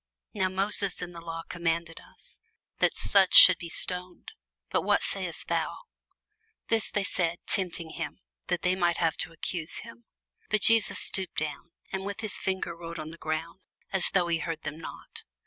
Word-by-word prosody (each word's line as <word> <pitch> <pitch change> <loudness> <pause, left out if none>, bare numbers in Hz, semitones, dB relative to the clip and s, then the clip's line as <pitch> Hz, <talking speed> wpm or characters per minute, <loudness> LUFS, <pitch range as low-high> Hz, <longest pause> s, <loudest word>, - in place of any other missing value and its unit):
Now 185 - 0
Moses 195 0 0
in 175 - -7
the 170 -1 -10
law 165 0 -6
commanded 170 -1 -3
us, - - -17 0.4
that - - +2
such 195 -2 +4
should 185 -2 +11
be 170 - -7
stoned: 180 +1 0 0.4
but - - +1
what - - +1
sayest - - -2
thou? - - -1 0.9
This 225 -1 +3
they 205 - -1
said, 175 -3 -1
tempting 175 -3 0
him, 160 +1 -6 0.3
that 180 -1 -2
they 180 0 +2
might 175 -2 +1
have 165 -2 +1
to - - -1
accuse 165 0 -5
him. 230 +1 -13 0.4
But 215 -1 +1
Jesus 225 0 +5
stooped 190 -2 -1
down, 155 +2 -4 0.2
and 190 0 -3
with 200 +2 -6
his 215 -4 -1
finger 190 -3 -3
wrote 170 0 -8
on 155 0 -7
the 165 - -12
ground, 160 +4 -4 0.3
as 190 -2 +4
though 180 -2 +2
he 165 -1 0
heard 165 -1 -5
them 145 +2 -6
not. 165 - -9
175 Hz, 180 wpm, -28 LUFS, 165-190 Hz, 0.9 s, should